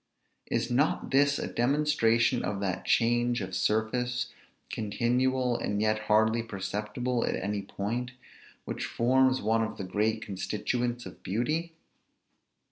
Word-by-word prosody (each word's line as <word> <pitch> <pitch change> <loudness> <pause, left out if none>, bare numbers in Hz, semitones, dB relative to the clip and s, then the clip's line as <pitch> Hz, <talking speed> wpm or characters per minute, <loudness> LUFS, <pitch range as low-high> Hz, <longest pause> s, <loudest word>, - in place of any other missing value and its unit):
Is 125 - -1
not 140 +6 +1
this 145 +1 +4
a - - -2
demonstration 120 -3 +2
of 100 -1 -2
that 95 -2 -2
change 120 +1 +2
of 95 - -5
surface, 125 +3 0 0.4
continual, 125 +4 +1
and 105 -3 -1
yet 110 0 +2
hardly 110 +2 +4
perceptible 110 +3 -2
at - - 0
any 100 +1 -2
point, 115 +6 -4 0.5
which - - -4
forms 130 +1 +2
one 110 +2 +2
of 110 - -4
the - - -4
great 110 +4 0
constituents 120 +4 -2
of - - -10
beauty? 155 - -1
115 Hz, 125 wpm, -29 LUFS, 105-125 Hz, 0.5 s, this